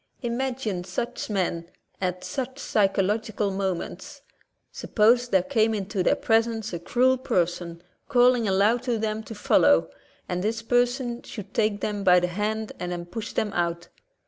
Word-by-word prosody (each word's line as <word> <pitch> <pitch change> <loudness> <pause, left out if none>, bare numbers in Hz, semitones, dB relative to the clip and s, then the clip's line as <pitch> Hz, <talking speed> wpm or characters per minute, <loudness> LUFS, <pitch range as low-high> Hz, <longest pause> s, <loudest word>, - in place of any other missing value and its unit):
Imagine 240 -6 -2
such 190 +7 -4
men 175 -4 -1 0.3
at 180 -1 -2
such 265 -1 -4
psychological 205 -2 0
moments. 195 - -4 0.5
Suppose 240 +3 +2
there 190 -6 +2
came 225 -2 +1
into 200 -1 -2
their - - +3
presence 225 -2 0
a 170 - -3
cruel 255 +8 +2
person 175 -5 -1 0.3
calling 245 -3 +4
aloud 205 +5 +3
to 245 -3 -1
them 215 0 -2
to 220 0 -9
follow, 80 - +3 0.4
and 180 0 -2
this 225 +2 -1
per 245 +1 +3
son 245 -1 -5
should 205 -3 -9
take 210 -2 +1
them 205 -1 -2
by 180 -2 +6
the 180 - 0
hand 210 +4 -2
and 180 0 -4
then 175 -1 -4
push 225 +6 -6
them 210 -2 -1
out. 170 0 -2
210 Hz, 155 wpm, -25 LUFS, 180-235 Hz, 0.5 s, by